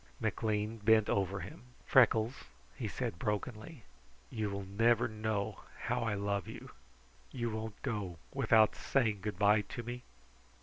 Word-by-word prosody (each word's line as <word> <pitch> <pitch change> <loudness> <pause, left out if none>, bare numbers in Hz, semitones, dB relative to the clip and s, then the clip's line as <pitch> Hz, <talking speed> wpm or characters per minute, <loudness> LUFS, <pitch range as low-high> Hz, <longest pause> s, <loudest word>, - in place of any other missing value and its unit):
McLean 110 0 -1
bent 110 0 +4
over 100 0 0
him. 155 - -9 0.2
"Freckles," 120 0 +4 0.3
he - - -3
said 85 - -3
brokenly, 110 +6 -3 0.5
"you 110 -2 -2
will 100 0 -4
never 115 +4 +3
know 110 -2 -2 0.2
how - - 0
I 115 -2 0
love 100 -2 -1
you. - - -9 0.6
You 120 -3 -2
won't 110 -1 -5
go 105 -9 -3 0.2
without 110 -5 +5
saying 115 -7 +1
good 105 -2 -4
bye 105 +1 +5
to 120 +3 -7
me?" 120 +1 -5
110 Hz, 140 wpm, -33 LUFS, 100-115 Hz, 0.6 s, without